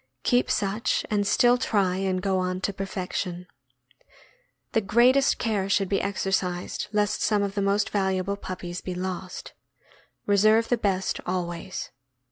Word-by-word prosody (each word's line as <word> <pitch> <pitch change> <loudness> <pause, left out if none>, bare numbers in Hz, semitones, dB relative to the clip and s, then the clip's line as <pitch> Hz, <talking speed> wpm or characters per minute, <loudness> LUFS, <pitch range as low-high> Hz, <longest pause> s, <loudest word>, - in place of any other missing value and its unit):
Keep 245 0 +2
such, 205 +4 0
and 205 -1 +1
still 245 +3 +4
try 195 -6 +1
and 190 -1 -1
go 190 -1 +1
on 185 0 -1
to 200 - -1
perfection. 185 -2 -4 1.3
The 225 - +2
greatest 245 +7 +4
care 205 -4 -1
should 195 -1 +2
be 195 - +1
exer 195 -1 -2
cised 180 -2 -1
lest 210 -1 0
some 210 -1 +2
of 200 -1 -2
the 200 - -1
most 200 +1 +1
valuable 190 -1 0
puppies 180 -2 -6
be 185 - -5
lost. 185 0 -5 0.7
Re 205 0 +3
serve 215 +3 +4
the 245 - +3
best 190 -3 0
always. 175 0 -4
195 Hz, 150 wpm, -26 LUFS, 185-210 Hz, 1.3 s, still